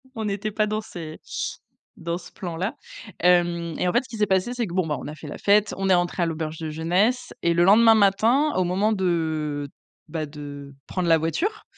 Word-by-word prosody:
on 220 - -3
n'était 205 +1 -2
pas 215 0 +1
dans 215 +1 -1
ces 165 -6 -8 0.8
dans 170 +1 -3
ce 175 - -12
plan-là. 180 +1 -4 0.5
Hem, 170 -2 +2
et 180 - 0
en - - +1
fait, 240 - +3
ce - - -16
qui 225 - -7
s'est 210 - +2
passé, 190 +5 +1
c'est 240 -4 -2
que, 170 - -8
bon, 180 -3 +1
bah, 150 - -1
on - - -7
a 150 - -7
fait 155 - -10
la - - -7
fête, 205 +1 +3
on 195 0 -1
est - - +6
entré 175 0 +1
à - - +2
l'auberge 160 -1 -3
de 160 -1 -4
jeunesse, 185 +11 0
et 170 0 +2
le 175 +1 +3
lendemain 225 +4 +7
matin, 225 +9 +3
au 185 - +2
moment 190 +5 +1
de, 160 -6 -1 0.4
bah, 155 -1 -3
de 145 -1 -9
prendre 180 -2 -2
la 165 - +6
voiture 325 - -2
180 Hz, 225 wpm, -24 LUFS, 160-210 Hz, 0.8 s, lendemain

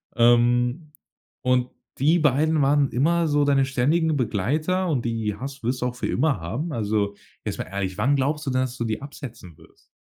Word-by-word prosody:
Ähm, 120 +5 +3 0.5
und 125 0 +1 0.3
die 155 +6 +3
beiden 150 +1 +2
waren 140 0 +3
immer 165 +6 +2
so 145 0 +2
deine 140 -1 +3
ständigen 150 +4 +1
Begleiter 150 - 0
und 125 -6 -1
die 110 -3 -2
hast 135 +1 -7
wirst 125 +2 -1
du - - +1
auch 125 0 -2
für - - -3
immer 140 -5 +1
haben? 135 - -4
Also, 105 -3 -1 0.3
jetzt - - -3
mal - - -1
ehrlich, 95 -1 -4
wann 140 +3 +2
glaubst 150 +3 -1
du, 135 - -1
dass 130 -1 -1
du 120 - -2
die 110 +2 -3
absetzen 120 - -10
wirst? - - -22
130 Hz, 185 wpm, -24 LUFS, 120-150 Hz, 0.5 s, Ähm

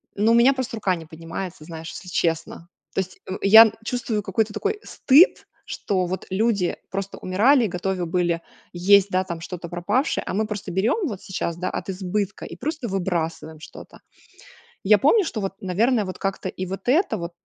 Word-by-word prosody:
Ну 215 +3 +3
у - - +5
меня 240 +4 +6
просто 260 -3 -4
рука 195 -4 +1
не 165 -2 -9
поднимается 165 +2 -7
знаешь, 160 0 -8
если 180 - -9
честно. 165 -1 -2 0.3
То - - +1
есть, 185 -1 -4
э, - - -2
я 220 +2 +9
чувствую 230 -3 -2
какой-то 210 +2 -1
такой 320 - -2
стыд, 290 +7 +4 0.2
что 185 -3 -2
вот 185 +2 -4
люди 200 -2 +1
просто 195 0 -5
умирали 235 +9 +3
и - - +1
готовы 180 0 -2
были 170 -1 0 0.3
есть, 200 +3 +5
да 185 0 +1
там, 170 -3 -6
что-то 170 0 -7
пропавшее, 205 - 0
а - - -3
мы 215 +3 0
просто 205 -3 -5
берем 235 - +1
вот 205 -7 -6
сейчас, 180 -3 -3
да, 180 +2 -3
от - - -5
избытка 195 +2 -3
и - - -9
просто 300 -5 -4
выбрасываем 165 -4 -3
что-то. - - -12 0.8
Я 210 +2 +6
помню, 390 - +4
что 225 -9 -4
вот, 195 -1 -3
наверное, 215 +5 +1
вот 185 - -7
как-то 195 0 -3
и 185 - -5
вот 195 +3 -7
это 330 +9 +2
вот, 170 0 -5
195 Hz, 190 wpm, -23 LUFS, 180-220 Hz, 0.8 s, я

